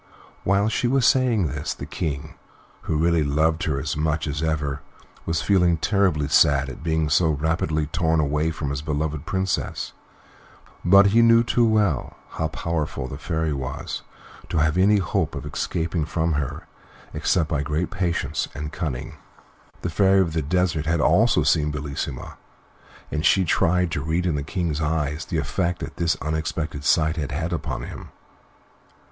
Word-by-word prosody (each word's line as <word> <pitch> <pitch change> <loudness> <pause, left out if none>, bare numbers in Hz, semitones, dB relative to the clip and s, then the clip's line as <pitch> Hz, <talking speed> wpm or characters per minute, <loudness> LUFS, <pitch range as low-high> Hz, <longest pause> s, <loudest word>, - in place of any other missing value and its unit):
While 100 +2 +2
she 110 +2 0
was 130 0 +2
saying 120 -8 +3
this, 75 - -3
the - - -7
King, 75 -2 -4 0.5
who 80 - 0
really 85 0 +2
loved 80 +3 +1
her 70 -3 0
as - - -3
much 80 0 0
as 75 0 -3
ever, 75 -3 -1 0.5
was 80 0 0
feeling 90 -4 +3
terribly 90 -4 +1
sad 70 -2 +4
at 65 - -9
being 80 -1 0
so 80 +3 +3
rapidly 80 0 0
torn 80 +1 0
away 75 +2 +1
from 75 -3 -3
his 70 0 -3
beloved 75 -1 -3
Princess, 95 -2 -2 0.9
but 100 +2 +6
he 115 - +6
knew 115 0 +6
too 120 0 +2
well 105 - +1
how - - -2
powerful 80 -6 -3
the 70 +2 -7
Fairy 80 0 -1
was 65 -1 -5 0.5
to - - -2
have 75 0 +2
any 100 +3 +4
hope 85 -4 -1
of 70 +1 -6
escaping 80 +2 -2
from 80 +1 -1
her 75 -3 -3 0.5
except 85 -3 +1
by 75 -3 0
great 75 +5 -2
patience 85 -6 -1
and 75 +1 -5
cunning. 65 -7 -4 0.7
The 90 - -2
Fairy 95 +2 +4
of 85 -4 +1
the 80 - 0
Desert 80 0 0
had 85 0 +1
also 85 +4 +4
seen 75 0 +2
Bellissima, 70 -3 -5 0.7
and 75 0 -2
she 95 0 +4
tried 90 +2 +2
to 70 - -2
read 80 +4 -1
in 85 - +1
the 75 - -1
King's 80 -1 -2
eyes 75 0 -1
the - - -3
effect 90 -1 -1
that - - -7
this 85 -2 +1
unexpected 75 -1 -3
sight 80 +2 +3
had 75 -2 -3
had 80 +4 -2
upon 80 -2 -3
him. - - -8
80 Hz, 165 wpm, -23 LUFS, 75-90 Hz, 0.9 s, but